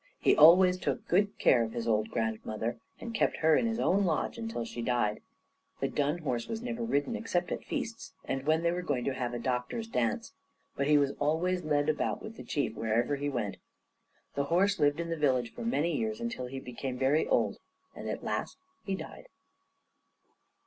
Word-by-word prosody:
He - - +4
always 180 +4 +7
took - - -2
good 200 +3 +2
care 120 - +5
of 110 - -5
his 115 -1 -3
old 110 -1 +2
grandmother, 110 0 -2 0.2
and 235 - -6
kept - - +1
her 160 -1 +4
in 230 - +2
his 225 0 -1
own 200 +3 +3
lodge 170 +5 -1
until 225 - -3
she 120 - -6
died. 115 -3 0 0.6
The - - 0
dun 145 +3 0
horse 125 -8 -2
was 225 +1 -4
never 240 -1 -3
ridden 230 0 0
except 185 -6 -1
at - - -3
feasts, 225 0 -5
and 135 +1 -3
when 160 +1 +3
they 170 - +3
were 180 +1 -2
going 145 -8 -1
to 135 - 0
have 125 -2 -2
a - - -1
doctors' 125 - -2
dance, 115 - -1 0.4
but 140 - 0
he 150 0 +6
was 140 -1 +2
always 175 +5 +1
led 145 -1 +1
about 155 -1 0
with 220 - -9
the - - -9
Chief 140 -6 -1
wherever 115 +6 +1
he 145 +1 -2
went. 120 -7 -3 0.8
The 140 - 0
horse 190 +6 +2
lived 145 +2 +3
in 170 0 -3
the - - 0
village 130 -5 +1
for - - -8
many 170 -8 +1
years, 220 0 -2
until 235 - -4
he 135 +1 -6
became 125 0 -5
very 135 +5 +2
old. - - +1 0.4
And - - -6
at - - -4
last - - -3 0.3
he 195 -3 -2
died. - - -9
145 Hz, 200 wpm, -30 LUFS, 125-185 Hz, 0.8 s, always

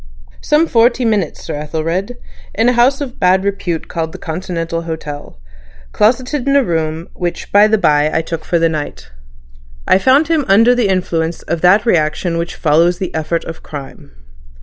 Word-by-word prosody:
"Some 300 +2 +2
forty 235 -2 +2
minutes, 210 -7 -1
Sir - - -5
Ethelred, 165 +9 -3 0.4
in 225 +3 +2
a - - +2
house 255 +4 +3
of 260 -3 -6
bad 185 +1 +3
repute 185 -5 -3
called 160 -1 -4
Continental 165 0 -4
Hotel, 150 - -7 0.5
closeted 255 +5 0
in 275 - +2
a 280 - +5
room 160 -3 -2
which 175 -1 -5
by 205 +1 +6
the 220 0 +2
by 150 -5 +2
I 165 - 0
took 165 -1 -5
for 170 - 0
the 165 0 +3
night. 155 - -5 0.8
I - - +4
found 270 +7 +3
him 320 -2 +1
under 225 +5 +5
the 245 -4 +1
influence 170 -3 -1
of 170 0 -3
that 195 +5 +4
reaction 165 -2 0
which 170 +1 -4
follows 165 +3 +2
the 185 - -5
effort 160 +1 -2
of 165 - -8
crime. 140 - -10
175 Hz, 170 wpm, -16 LUFS, 160-230 Hz, 0.8 s, by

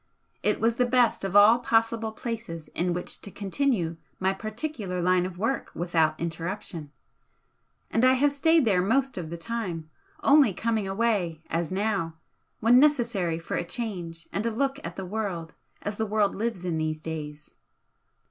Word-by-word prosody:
It 210 - +1
was 230 +1 +2
the 250 - +3
best 245 -3 +3
of 195 0 -3
all 210 +4 +8
possible 225 -1 +1
places 220 -9 -6
in 175 +1 -1
which 175 +1 -3
to - - -7
continue 195 -4 -1 0.2
my 190 +1 +2
particular 215 -2 -4
line 180 +1 +2
of 180 -1 -9
work 225 +8 -1
without 165 -3 +1
interruption 170 -2 -4 1.0
and 225 - +2
I 255 0 +7
have 280 +2 +3
stayed 320 +1 +4
there 195 -5 +3
most 265 +7 +1
of 160 -3 -6
the 170 - -5
time, 170 -6 -4 0.3
only 275 -7 +6
coming 220 0 -1
away, 195 -6 0
as 165 +1 -1
now, 195 -4 -1 0.5
when 235 +3 +6
necessary 235 - +2
for 165 - -7
a - - -1
change 175 -4 -5
and 200 - -1
a - - +2
look 270 +4 -1
at 170 +1 -6
the 190 - -5
world 185 -5 -4 0.3
as 205 0 -3
the 220 - -1
world 210 -1 +2
lives 210 -4 -3
in 165 -3 -1
these 155 0 -1
days." 150 -2 -7
200 Hz, 165 wpm, -27 LUFS, 170-230 Hz, 1.0 s, all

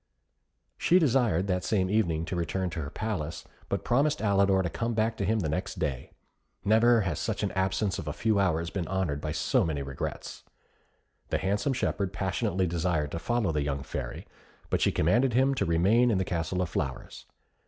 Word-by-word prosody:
She 180 - +4
desired, 120 - +2
that 90 -2 -1
same 95 -4 +1
evening, 85 -6 +1
to 80 - -4
return 90 +2 -2
to 80 - -4
her 70 - -5
palace; 85 -6 -4 0.3
but - - -1
promised 145 +5 +2
Alidor 100 -2 +3
to 85 - -1
come 115 0 -2
back 110 +1 +1
to 100 - -1
him 110 +1 +1
the 80 - -1
next 75 - -3
day. 65 -5 -3 0.6
Never 115 +2 +5
has 90 -7 -2
an - - 0
absence 95 +1 0
of 75 - -7
a - - -1
few 110 +5 +1
hours 85 -3 +1
been 90 -5 -3
honoured 90 -7 -1
by 75 - -3
so 80 -1 +1
many 75 -4 -2
regrets. 70 0 -5 0.9
The - - +1
handsome 105 +8 0
shepherd 100 -6 -1
passionately 95 -1 0
desired 85 -3 -1
to 85 - -3
follow 115 +1 0
the 75 -2 0
young 70 -1 -2
Fairy, 70 -5 -5 0.5
but - - +1
she - - +3
commanded 120 +11 +2
him 135 +3 +3
to 135 - 0
remain 95 +10 +3
in 110 - +2
the 95 - 0
Castle 85 +2 -1
of 90 - -4
Flowers. 65 -5 -4
95 Hz, 190 wpm, -28 LUFS, 80-110 Hz, 0.9 s, Never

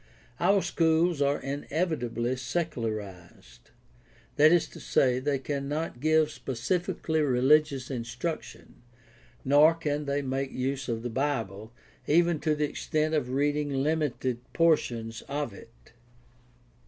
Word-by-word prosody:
Our 200 -1 +3
schools 165 -1 +2
are 140 +1 +2
ineyitably 135 -4 -2
"secularized"; 110 - -5 0.7
that 155 +2 +6
is 175 -2 +3
to - - -12
say, 125 -1 +2
they 140 +1 0
cannot 140 +1 -3
give 155 +1 +3
specifically 160 +5 -2
religious 140 0 +2
instruction, 125 +6 -6 0.6
nor 150 +4 +6
can 150 -2 -2
they 140 0 -1
make 135 0 -2
use 135 +1 -3
of 115 -1 -2
the 120 - -3
Bible, 115 -6 -2 0.4
even 170 +1 +3
to 155 0 +1
the 150 0 0
extent 155 +1 -1
of 145 -5 0
reading 145 +2 0
limited 135 -3 -1
portions 120 -9 +1
of 145 -5 -3
it. 115 +4 -16
140 Hz, 115 wpm, -28 LUFS, 125-155 Hz, 0.7 s, that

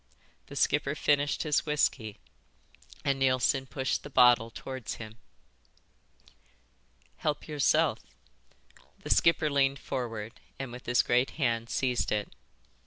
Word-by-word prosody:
The - - -10
skipper 140 +2 +1
finished 145 -1 +1
his 150 -3 +1
whisky, 125 -8 0 0.9
and 135 -1 +1
Neilson 130 0 +2
pushed 130 0 -2
the - - -10
bottle 125 -3 +5
towards 130 +1 -6
him. 110 0 -10 2.0
"Help 150 -1 -2
yourself." 150 -3 +2 1.0
The - - -4
skipper 165 -2 +3
leaned 140 -1 +2
forward 115 -3 -5 0.2
and 135 -3 -6
with 125 +1 -10
his 125 0 +3
great 125 +2 +2
hand 115 -5 0
seized 125 -2 0
it. 105 -1 -2
130 Hz, 115 wpm, -29 LUFS, 120-140 Hz, 2.0 s, bottle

